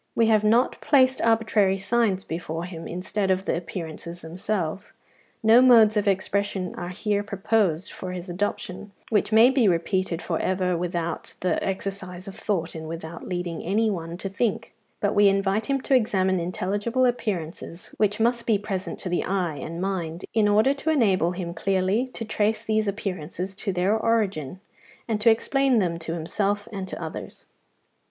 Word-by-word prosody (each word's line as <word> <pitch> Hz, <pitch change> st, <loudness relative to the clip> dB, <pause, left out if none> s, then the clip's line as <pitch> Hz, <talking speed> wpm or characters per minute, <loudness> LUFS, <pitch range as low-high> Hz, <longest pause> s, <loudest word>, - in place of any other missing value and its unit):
We 230 Hz, -, +4 dB
have 215 Hz, -1 st, +4 dB
not 230 Hz, +4 st, +2 dB
placed 260 Hz, -3 st, +4 dB
arbitrary 220 Hz, -4 st, +3 dB
signs 195 Hz, -1 st, +1 dB
before 165 Hz, 0 st, -4 dB
him 170 Hz, -2 st, -7 dB
instead 190 Hz, +3 st, -2 dB
of 190 Hz, 0 st, +1 dB
the -, -, 0 dB
appearances 170 Hz, 0 st, -6 dB
themselves; 180 Hz, +1 st, -3 dB, 0.5 s
no 225 Hz, +3 st, +7 dB
modes 230 Hz, -4 st, +7 dB
of 210 Hz, -1 st, +1 dB
expression 195 Hz, -1 st, 0 dB
are 175 Hz, -, -5 dB
here 205 Hz, +2 st, -1 dB
proposed 200 Hz, -4 st, 0 dB
for 185 Hz, -, -6 dB
his 180 Hz, 0 st, -6 dB
adoption 195 Hz, +1 st, -4 dB, 0.2 s
which 210 Hz, 0 st, +2 dB
may 225 Hz, +4 st, +7 dB
be 260 Hz, -5 st, +3 dB
repeated 175 Hz, 0 st, 0 dB
for 165 Hz, -2 st, -2 dB
ever 185 Hz, -1 st, 0 dB
without 170 Hz, -1 st, -3 dB
the 180 Hz, -, 0 dB
exercise 190 Hz, -1 st, -4 dB
of 195 Hz, -, -6 dB
thought 180 Hz, -5 st, -2 dB
and 160 Hz, -1 st, -7 dB
without 165 Hz, 0 st, -7 dB
leading 175 Hz, -2 st, -3 dB
any 215 Hz, +4 st, +1 dB
one 170 Hz, -2 st, -5 dB
to 195 Hz, -, -4 dB
think; 205 Hz, +2 st, -2 dB, 0.3 s
but 205 Hz, 0 st, +1 dB
we 205 Hz, 0 st, +5 dB
invite 195 Hz, +2 st, +1 dB
him 275 Hz, -1 st, +1 dB
to 270 Hz, -, 0 dB
examine 190 Hz, -6 st, +2 dB
intelligible 205 Hz, +8 st, 0 dB
appearances, 180 Hz, -8 st, -3 dB
which 210 Hz, 0 st, +1 dB
must 235 Hz, +1 st, +1 dB
be 220 Hz, -3 st, +4 dB
present 195 Hz, -2 st, -4 dB
to -, -, -5 dB
the 175 Hz, -1 st, 0 dB
eye 180 Hz, -6 st, -1 dB
and 165 Hz, +3 st, -6 dB
mind, 175 Hz, -3 st, -3 dB
in 220 Hz, -2 st, +3 dB
order 215 Hz, +6 st, +4 dB
to 280 Hz, +3 st, -3 dB
enable 195 Hz, -, +3 dB
him 175 Hz, -2 st, -5 dB
clearly 195 Hz, +7 st, +1 dB
to 235 Hz, -2 st, -6 dB
trace 215 Hz, 0 st, 0 dB
these 215 Hz, -1 st, 0 dB
appearances 185 Hz, -2 st, -3 dB
to 195 Hz, +1 st, -3 dB
their 185 Hz, +3 st, +1 dB
origin, 200 Hz, -9 st, 0 dB, 0.5 s
and 215 Hz, -2 st, -1 dB
to 230 Hz, -, +6 dB
explain 265 Hz, +3 st, +3 dB
them 175 Hz, -5 st, 0 dB
to 165 Hz, 0 st, -4 dB
himself 200 Hz, +5 st, -1 dB
and 195 Hz, -2 st, -4 dB
to -, -, -6 dB
others. 160 Hz, -2 st, -7 dB
195 Hz, 170 wpm, -25 LUFS, 175-215 Hz, 0.5 s, no